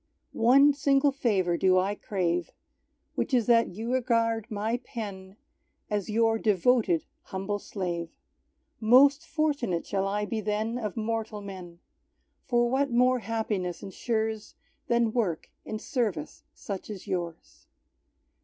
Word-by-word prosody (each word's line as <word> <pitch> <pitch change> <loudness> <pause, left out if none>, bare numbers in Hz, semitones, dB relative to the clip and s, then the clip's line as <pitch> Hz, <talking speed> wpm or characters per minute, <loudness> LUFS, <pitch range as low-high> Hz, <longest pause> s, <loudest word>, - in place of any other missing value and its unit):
One 275 +5 +6
single 275 0 +3
favour 195 -10 +1
do 185 +1 +4
I 190 +2 +2
crave, 180 -4 -1 0.6
Which 260 - 0
is 240 -3 +2
that 230 -1 +4
You 230 +4 -3
regard 230 -3 +1
my 220 +2 -1
pen 200 -5 -8 0.5
As 205 -1 -1
Your 225 +1 +2
devoted 210 -4 +2 0.2
humble 195 +2 -3
slave. 175 -5 -4 0.7
Most 275 +7 +6
fortunate 280 - 0
shall 195 -1 -1
I 205 +1 -1
be 220 +1 -3
then 215 +3 -1
Of 215 -1 -4
mortal 225 -1 -2
men; 180 -3 -9 0.7
For 240 -1 +3
what 270 +3 +1
more 250 +1 +3
happiness 210 -6 -3
ensures 220 +2 -3 0.3
Than 235 -2 +2
work 195 -10 -1
in 215 - -4
service 215 - -3
such 200 0 -6
as 205 -3 -7
Yours? 170 -3 -5
220 Hz, 125 wpm, -28 LUFS, 190-240 Hz, 0.7 s, One